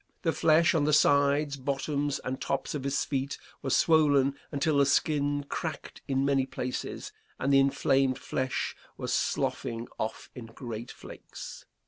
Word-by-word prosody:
The 165 -2 +2
flesh 160 +1 +4
on 155 -3 +2
the 150 - +2
sides, 145 0 +3
bottoms, 140 +1 -1
and 130 +1 -4
tops - - -2
of 145 -3 -3
his 140 0 0
feet 140 0 -2 0.2
was 135 -2 +2
swollen 145 -4 +4 0.2
until 145 +1 +1
the 140 - +5
skin 145 0 +1
cracked 160 -1 -5
in 135 0 +1
many 135 -1 +2
places, 125 -1 -4 0.3
and 140 +2 +1
the 135 - +7
inflamed 135 -1 +2
flesh 130 -1 -2 0.2
was - - -3
sloughing 115 0 -1
off 110 - -4
in 120 -3 -9
great 115 0 -7
flakes. - - -10
140 Hz, 150 wpm, -29 LUFS, 130-145 Hz, 0.3 s, the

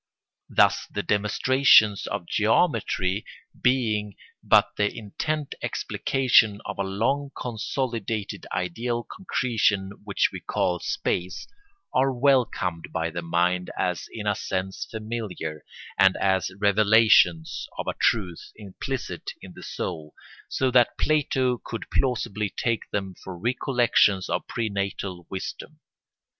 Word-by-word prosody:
Thus - - +3
the - - -3
demonstrations 110 0 +4
of 100 -3 -4
geometry 105 - +1 0.4
being 110 -5 +1 0.3
but - - +4
the 105 0 +1
intent 145 +8 -3
explication 120 -6 +2
of - - -6
a - - +2
long 115 +9 -1
consolidated 115 -3 -3
ideal 120 +7 -2
concretion 110 - 0
which 100 -2 +1
we - - -5
call 90 -1 -1
space, 90 +2 -2 0.5
are 135 +1 +3
welcomed 120 - +1
by 85 0 -2
the 85 +1 -4
mind 90 +2 0
as 90 -2 -1
in 110 -2 -6
a 105 - +2
sense 95 -1 -4
familiar 110 -8 -5 0.4
and 95 -1 +5
as 95 -1 +1
revelations 100 -5 +4
of - - -3
a - - -1
truth 90 -7 0
implicit 110 +6 -5
in - - -11
the - - -12
soul, 75 -1 -5 0.3
so 130 -1 0
that 125 -1 +4
Plato 130 -5 +1
could 115 - -6
plausibly 110 -5 0
take 115 +2 -2
them 95 -2 -3
for 95 -2 -7
recollections 120 -3 +2
of - - -2
prenatal 100 -4 -3
wisdom. 95 - -6
105 Hz, 120 wpm, -25 LUFS, 95-120 Hz, 0.5 s, and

